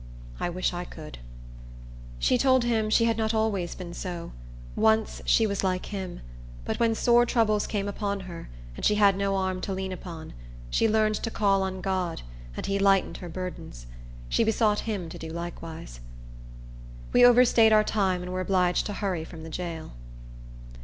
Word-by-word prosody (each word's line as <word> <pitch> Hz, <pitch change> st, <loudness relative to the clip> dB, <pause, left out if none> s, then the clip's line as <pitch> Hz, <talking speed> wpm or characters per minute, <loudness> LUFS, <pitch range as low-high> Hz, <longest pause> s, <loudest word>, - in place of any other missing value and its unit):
I -, -, -1 dB
wish 180 Hz, +1 st, -1 dB
I 175 Hz, 0 st, -3 dB
could." 155 Hz, -, -10 dB, 1.0 s
She 250 Hz, -, +2 dB
told 260 Hz, -1 st, +4 dB
him 225 Hz, -3 st, +1 dB
she 230 Hz, +2 st, +4 dB
had 230 Hz, -1 st, +1 dB
not 220 Hz, 0 st, 0 dB
always 205 Hz, -6 st, 0 dB
been 175 Hz, -2 st, -8 dB
so; 175 Hz, -1 st, -6 dB, 0.4 s
once, 220 Hz, 0 st, +2 dB
she 225 Hz, -, +4 dB
was 200 Hz, -2 st, -1 dB
like 185 Hz, -1 st, 0 dB
him; 190 Hz, -3 st, -6 dB, 0.4 s
but -, -, -3 dB
when 230 Hz, -1 st, +2 dB
sore 240 Hz, +1 st, +4 dB
troubles 220 Hz, -4 st, +1 dB
came 200 Hz, -2 st, -2 dB
upon 200 Hz, -1 st, -2 dB
her, 175 Hz, -3 st, -9 dB, 0.3 s
and -, -, -9 dB
she 210 Hz, -, +4 dB
had 200 Hz, -2 st, +5 dB
no 195 Hz, 0 st, 0 dB
arm 190 Hz, -1 st, -1 dB
to 195 Hz, -, -3 dB
lean 190 Hz, 0 st, -3 dB
upon, 170 Hz, -3 st, -8 dB, 0.4 s
she 225 Hz, -, +3 dB
learned 215 Hz, 0 st, +3 dB
to 230 Hz, -, -2 dB
call 200 Hz, -3 st, +2 dB
on 190 Hz, -1 st, -3 dB
God, 185 Hz, -3 st, -2 dB, 0.3 s
and -, -, -4 dB
he 200 Hz, 0 st, 0 dB
lightened 195 Hz, -1 st, +3 dB
her 175 Hz, -, -8 dB
burdens. 170 Hz, -, -7 dB, 0.4 s
She -, -, +2 dB
besought 220 Hz, 0 st, +1 dB
him 190 Hz, -5 st, -3 dB
to 160 Hz, -, -9 dB
do 160 Hz, -, -6 dB
likewise. 165 Hz, -, -7 dB, 1.1 s
We 245 Hz, -, +6 dB
overstaid 245 Hz, -2 st, +6 dB
our 215 Hz, 0 st, +6 dB
time, 190 Hz, -4 st, 0 dB
and 180 Hz, 0 st, -5 dB
were 185 Hz, -, -1 dB
obliged 180 Hz, -1 st, +1 dB
to 205 Hz, -, -4 dB
hurry 190 Hz, -5 st, -2 dB
from 160 Hz, 0 st, -10 dB
the 160 Hz, -, -8 dB
jail. 165 Hz, -2 st, -5 dB
195 Hz, 180 wpm, -27 LUFS, 180-220 Hz, 1.1 s, We